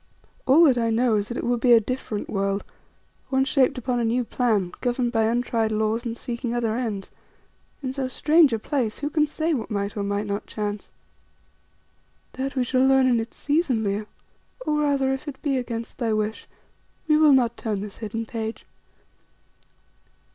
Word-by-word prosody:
"All 285 Hz, +6 st, +7 dB
that 265 Hz, -6 st, +5 dB
I 230 Hz, -1 st, +1 dB
know 230 Hz, +1 st, +2 dB
is 205 Hz, 0 st, -1 dB
that 240 Hz, -, -5 dB
it -, -, -3 dB
would 240 Hz, 0 st, 0 dB
be 245 Hz, 0 st, +5 dB
a 230 Hz, -, +8 dB
different 225 Hz, -2 st, -4 dB
world, 195 Hz, 0 st, -1 dB, 0.7 s
one 265 Hz, 0 st, +2 dB
shaped 270 Hz, -1 st, +2 dB
upon 250 Hz, 0 st, -1 dB
a -, -, 0 dB
new 235 Hz, +2 st, +1 dB
plan, 220 Hz, -7 st, 0 dB
governed 245 Hz, -1 st, 0 dB
by 225 Hz, -2 st, +2 dB
untried 230 Hz, -1 st, 0 dB
laws 220 Hz, +2 st, 0 dB
and 230 Hz, 0 st, -4 dB
seeking 240 Hz, 0 st, -4 dB
other 230 Hz, -2 st, 0 dB
ends. 220 Hz, -6 st, -3 dB, 0.7 s
In 260 Hz, -1 st, -2 dB
so 265 Hz, -1 st, -2 dB
strange 300 Hz, +2 st, +4 dB
a 225 Hz, -, +1 dB
place 225 Hz, -1 st, -2 dB
who 290 Hz, 0 st, -3 dB
can 305 Hz, 0 st, +2 dB
say 320 Hz, +2 st, -1 dB
what 235 Hz, -6 st, -3 dB
might 200 Hz, -1 st, -2 dB
or 205 Hz, -, -2 dB
might 200 Hz, +1 st, -1 dB
not 200 Hz, 0 st, -4 dB
chance?" 210 Hz, -1 st, -4 dB, 1.4 s
"That 270 Hz, +2 st, -4 dB
we 255 Hz, -, +2 dB
shall 255 Hz, +1 st, +2 dB
learn 265 Hz, 0 st, +5 dB
in 245 Hz, -2 st, +3 dB
its 225 Hz, +1 st, -6 dB
season, 290 Hz, -6 st, +1 dB
Leo. 205 Hz, +1 st, -2 dB, 0.6 s
Or, 300 Hz, 0 st, +1 dB
rather, 280 Hz, -2 st, +2 dB
if 270 Hz, +3 st, -6 dB
it 280 Hz, -2 st, -6 dB
be 285 Hz, -3 st, +1 dB
against 235 Hz, -2 st, -6 dB
thy 230 Hz, -3 st, 0 dB
wish, 215 Hz, 0 st, -2 dB, 0.6 s
we 305 Hz, -, +4 dB
will 305 Hz, -2 st, +6 dB
not 240 Hz, -3 st, +3 dB
turn 210 Hz, -3 st, -3 dB
this 205 Hz, -1 st, -7 dB
hidden 225 Hz, +1 st, -4 dB
page. 225 Hz, 0 st, -5 dB
240 Hz, 185 wpm, -24 LUFS, 220-265 Hz, 1.4 s, a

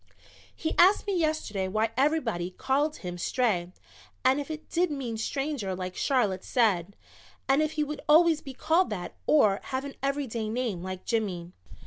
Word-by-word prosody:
"He 320 Hz, -, -2 dB
asked 375 Hz, +4 st, +6 dB
me 400 Hz, -2 st, -1 dB
yesterday 310 Hz, -, 0 dB
why 215 Hz, +3 st, 0 dB
everybody 255 Hz, -, +1 dB
called 280 Hz, +10 st, 0 dB
him 175 Hz, -1 st, -6 dB
Stray 180 Hz, -5 st, 0 dB, 0.5 s
and 265 Hz, +3 st, +4 dB
if 285 Hz, -, -8 dB
it 315 Hz, 0 st, -6 dB
did 355 Hz, +1 st, +1 dB
mean 265 Hz, -6 st, -4 dB
Stranger 260 Hz, -4 st, -2 dB
like 185 Hz, 0 st, -5 dB
Charlotte 210 Hz, -9 st, +1 dB
said, 200 Hz, -6 st, +1 dB, 0.5 s
and 270 Hz, +2 st, +4 dB
if 310 Hz, 0 st, 0 dB
he 305 Hz, -, 0 dB
would 300 Hz, 0 st, -5 dB
always 320 Hz, 0 st, +6 dB
be 270 Hz, -3 st, -9 dB
called 335 Hz, +7 st, +2 dB
that 185 Hz, -4 st, -5 dB
or 210 Hz, -10 st, +4 dB
have 265 Hz, +1 st, -3 dB
an 280 Hz, -, -6 dB
everyday 265 Hz, -6 st, -2 dB
name 225 Hz, -6 st, -2 dB
like 185 Hz, 0 st, -6 dB
Jimmy. 185 Hz, -7 st, -2 dB
255 Hz, 165 wpm, -28 LUFS, 195-300 Hz, 0.5 s, asked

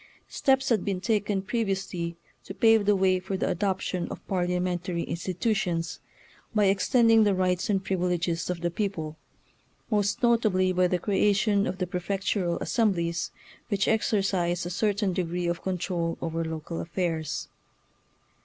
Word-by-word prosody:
Steps 265 Hz, -1 st, +2 dB
had 225 Hz, -5 st, +2 dB
been 195 Hz, -3 st, -1 dB
taken 205 Hz, -1 st, 0 dB
pre 230 Hz, +3 st, -1 dB
viously 185 Hz, -4 st, -3 dB, 0.3 s
to 195 Hz, -, -8 dB
pave 225 Hz, -2 st, +4 dB
the 205 Hz, -, +5 dB
way 190 Hz, -1 st, +3 dB
for 190 Hz, +1 st, -4 dB
the -, -, -1 dB
adoption 185 Hz, -1 st, -1 dB
of -, -, -9 dB
parliamentary 180 Hz, -1 st, -1 dB
institutions 180 Hz, -2 st, -2 dB, 0.6 s
by 210 Hz, -1 st, +4 dB
extend 225 Hz, +5 st, +3 dB
ing 225 Hz, -1 st, +7 dB
the 205 Hz, -2 st, +3 dB
rights 185 Hz, 0 st, 0 dB
and 195 Hz, -2 st, +1 dB
privileges 175 Hz, -2 st, -1 dB
of 180 Hz, -2 st, -3 dB
the 175 Hz, 0 st, 0 dB
peo 200 Hz, +3 st, 0 dB
ple, 160 Hz, -5 st, -7 dB, 0.7 s
most 205 Hz, +2 st, +1 dB
notably 215 Hz, -6 st, +3 dB
by 180 Hz, 0 st, +3 dB
the 180 Hz, -, +1 dB
creation 200 Hz, +2 st, +2 dB
of 185 Hz, -, -3 dB
the 185 Hz, -, -1 dB
prefectural 180 Hz, 0 st, -1 dB
assemblies, 170 Hz, -7 st, 0 dB, 0.4 s
which 200 Hz, -2 st, +1 dB
exercise 195 Hz, -5 st, +1 dB
a 175 Hz, -, -4 dB
certain 200 Hz, 0 st, 0 dB
degree 175 Hz, 0 st, -2 dB
of 170 Hz, 0 st, -1 dB
control 180 Hz, -2 st, -2 dB
over 165 Hz, 0 st, -2 dB
local 160 Hz, +1 st, -4 dB
affairs. 165 Hz, -3 st, -2 dB
185 Hz, 150 wpm, -27 LUFS, 175-205 Hz, 0.7 s, ing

